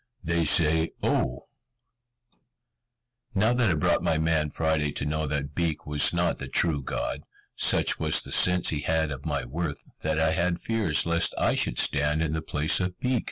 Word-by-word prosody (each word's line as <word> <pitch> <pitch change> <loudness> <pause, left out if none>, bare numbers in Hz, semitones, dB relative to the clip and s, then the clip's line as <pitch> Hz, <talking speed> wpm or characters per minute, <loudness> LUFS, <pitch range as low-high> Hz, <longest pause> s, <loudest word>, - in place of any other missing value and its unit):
"They 85 0 0
say 80 +1 +3
'O.'" 65 0 -1 1.9
Now 110 +5 +3
that 120 -3 +2
I 85 - +2
brought 75 - +1
my 80 - +1
man 80 -1 +1
Friday 80 -1 0
to - - -4
know 75 +1 -2
that 70 0 -3
Beek 80 -1 -2
was 75 -1 +2
not 85 -1 0
the - - -5
true 80 -5 +1
God, - - -4 0.3
such - - +3
was - - +3
the - - -8
sense 90 -1 +3
he 75 - -2
had 80 +1 0
of 70 +2 -6
my 70 -4 -2
worth, 75 +3 -4 0.2
that 80 0 -1
I 80 0 +2
had 85 +1 0
fears 110 -8 0
lest 85 0 +1
I - - +2
should - - 0
stand 75 +3 +1
in 80 -1 -2
the 80 - -2
place 75 -1 +1
of 90 -1 -3
Beek. 125 -1 0
80 Hz, 185 wpm, -26 LUFS, 75-85 Hz, 1.9 s, say